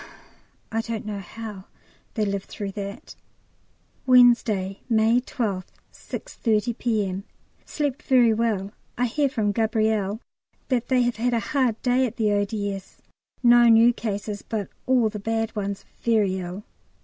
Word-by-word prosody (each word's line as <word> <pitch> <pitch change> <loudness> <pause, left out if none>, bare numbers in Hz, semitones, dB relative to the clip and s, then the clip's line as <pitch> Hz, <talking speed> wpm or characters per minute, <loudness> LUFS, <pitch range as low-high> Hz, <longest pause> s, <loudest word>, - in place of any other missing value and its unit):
I 225 - 0
don't 225 -2 -5
know 210 -1 -4
how 205 0 -8 0.5
they 215 -2 +1
live 200 -1 -2
through 200 -2 -6
that. 200 0 -7 0.9
Wednesday, 235 -6 +4
May 225 +1 +4
12th, 205 -7 -3 0.3
6.30 225 0 -2
P.M. 200 -5 -1 0.4
Slept 290 -2 -2
very 245 -4 +4
well. 215 -3 -1 0.3
I 245 - +2
hear 280 +4 +1
from 215 -5 0
Gabrielle 220 -2 0 0.5
that 245 -3 0
they 255 -2 +3
have 240 -2 -1
had 240 +1 +1
a - - +2
hard 255 -6 +2
day 255 +1 +3
at 235 - -8
the 215 -3 +1
O.D.S.; 205 -1 -2 0.5
no 240 0 +7
new 230 +1 +6
cases, 205 -2 -4
but 215 -4 -4 0.2
all 250 -3 +4
the 210 0 -6
bad 225 +1 -2
ones 200 -1 -4
very 210 -5 +1
ill. 180 +3 -6
220 Hz, 140 wpm, -24 LUFS, 205-240 Hz, 0.9 s, no